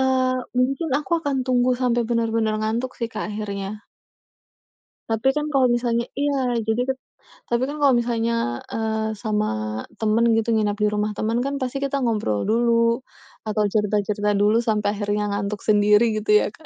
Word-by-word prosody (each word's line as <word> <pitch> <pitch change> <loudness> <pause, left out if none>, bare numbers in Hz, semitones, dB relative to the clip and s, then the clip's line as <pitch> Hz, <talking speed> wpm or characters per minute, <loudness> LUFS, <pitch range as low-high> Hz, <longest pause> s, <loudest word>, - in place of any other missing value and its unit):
eee, 260 -1 +2 0.2
mungkin 275 +6 +1
aku 295 - -9
akan 285 -3 -1
tunggu 250 0 +2
sampai 240 -1 +2
benar-benar 225 -2 +1
ngantuk 230 +4 -1
sih 230 - -3
Kak 215 0 -4
akhirnya. 205 0 -5 1.3
Tapi 225 +3 0
kan 300 +1 -1
kalau 260 -2 +4
misalnya 235 -1 0
iya. 270 -4 0
Jadi 220 +2 0
ket 265 - 0 0.5
tapi 235 +1 0
kan 295 - -5
kalau 275 -2 +5
misalnya, 230 - 0
eee, 220 0 -1
sama 210 0 -1 0.5
temen 220 +2 +3
gitu 225 +1 0
nginep 210 -2 +2
di 210 - +4
rumah, 210 0 0
temen 225 +2 0
kan 280 - -2
pasti 260 +1 -2
kita 275 0 -1
ngobrol 210 - 0
dulu, 230 +1 +3 0.5
atau 215 0 +1
cerita-cerita 210 -1 0
dulu 205 +2 +3
sampai 215 -3 0
akhirnya 205 0 -1
ngantuk 200 0 -3
sendiri 210 +1 +4
gitu 210 0 -1
ya - - 0
Kak. 315 +8 -18
225 Hz, 160 wpm, -23 LUFS, 210-250 Hz, 1.3 s, kalau